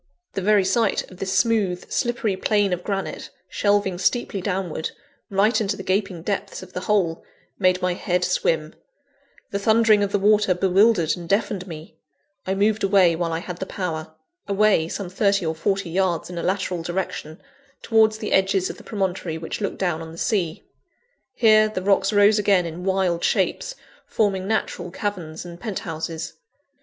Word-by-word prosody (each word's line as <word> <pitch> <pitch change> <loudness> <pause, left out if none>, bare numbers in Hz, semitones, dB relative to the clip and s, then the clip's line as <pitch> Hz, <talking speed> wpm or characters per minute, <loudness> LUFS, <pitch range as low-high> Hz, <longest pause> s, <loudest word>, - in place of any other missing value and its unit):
The 195 - -2
very 205 0 +3
sight 225 +1 +1
of 185 - -12
this 190 0 -3
smooth, 205 -6 +1
slippery 240 -5 0
plane 205 0 +1
of 180 0 -3
granite, 195 -2 -4 0.2
shelving 205 -3 +1
steeply 200 0 0
downward, 180 -4 -2 0.4
right 205 +4 +2
into 200 -1 -1
the 195 - -7
gaping 190 -3 -1
depths 195 0 -3
of 185 - -14
the - - -3
hole, 185 -4 0 0.4
made 185 -1 +2
my 180 -1 +2
head 180 0 -1
swim; 165 -3 0 0.8
the 200 - -1
thundering 220 0 +4
of 200 -1 0
the 205 - +2
water 205 -1 +3
bewildered 190 -1 +3
and 170 -2 -9
deafened 200 -2 0
me 160 -1 -10 0.5
I 190 - 0
moved 210 +2 +1
away 190 -4 +4
while 170 0 -2
I 165 - -1
had 180 -1 -6
the 190 - -4
power: 160 -4 -4 0.3
away, 200 -5 +3
some 195 +2 -4
thirty 200 0 +1
or 160 - 0
forty 195 +2 -1
yards 180 -2 0
in 175 - -5
a - - -2
lateral 185 -2 -1
direction, 175 -2 -4 0.4
towards 220 -1 +3
the 215 - -5
edges 190 -1 +2
of - - -12
the - - -13
promontory 185 -5 -2
which 165 +6 -6
looked 200 - -2
down 175 -4 -1
on 160 0 -8
the 165 - -11
sea. 175 -5 -1 0.7
Here, 215 -3 +5
the 185 -4 -4
rocks 195 0 +3
rose 205 +1 +5
again 195 -3 +3
in 170 +2 -6
wild 190 -3 +1
shapes, - - 0 0.3
forming 195 -3 0
natural 190 -4 -2
caverns 175 -5 -5
and 170 -1 -9
penthouses. 165 -6 -5
190 Hz, 170 wpm, -23 LUFS, 175-205 Hz, 0.8 s, Here